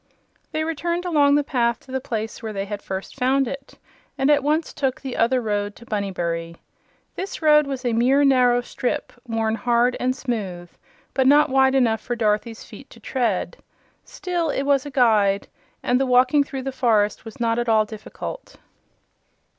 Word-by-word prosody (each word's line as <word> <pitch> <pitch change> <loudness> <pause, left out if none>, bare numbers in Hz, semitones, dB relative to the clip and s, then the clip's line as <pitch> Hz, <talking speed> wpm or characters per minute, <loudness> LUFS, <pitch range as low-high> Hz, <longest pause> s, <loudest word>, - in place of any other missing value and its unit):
They 310 - -1
returned 340 +3 -2
along 290 -5 +4
the 295 - +2
path 240 -4 0
to 265 - -15
the 265 0 -2
place 220 -2 -4
where 220 -2 -5
they 195 -1 -3
had 205 0 -6
first 190 0 -6
found 270 +1 +1
it, 275 +2 -8 0.4
and 270 +2 +3
at 290 -1 +4
once 305 +3 0
took 270 -3 -1
"the 265 -2 -6
other 245 +3 +2
road" 205 -3 -2
to 235 - -14
Bunnybury. 170 -6 -3 0.6
This 385 +1 -5
road 300 -1 +5
was 270 -2 -5
a 240 - +1
mere 255 +5 +3
narrow 250 -3 +4
strip, 245 0 -3
worn 225 -1 0
hard 240 +2 +2
and 255 +1 0
smooth 190 -10 -4 0.4
but 265 -1 +2
not 290 0 +5
wide 265 0 +4
enough 230 -4 +2
for 240 - -3
Dorothy's 220 0 -1
feet - - -13
to - - -15
tread. 235 -8 -2 0.5
Still, 355 -9 -3
it 275 - -1
was 280 0 +1
a - - -5
guide, 215 -7 +2 0.4
and 250 +1 +2
the 270 - +1
walking 255 +3 +4
through 270 -2 -6
the 270 - -3
forest 220 -5 +1
was 225 -1 -11
not 230 0 +1
at 240 -1 -1
all 215 -1 +4
difficult. 220 - -8
250 Hz, 180 wpm, -22 LUFS, 220-275 Hz, 0.6 s, road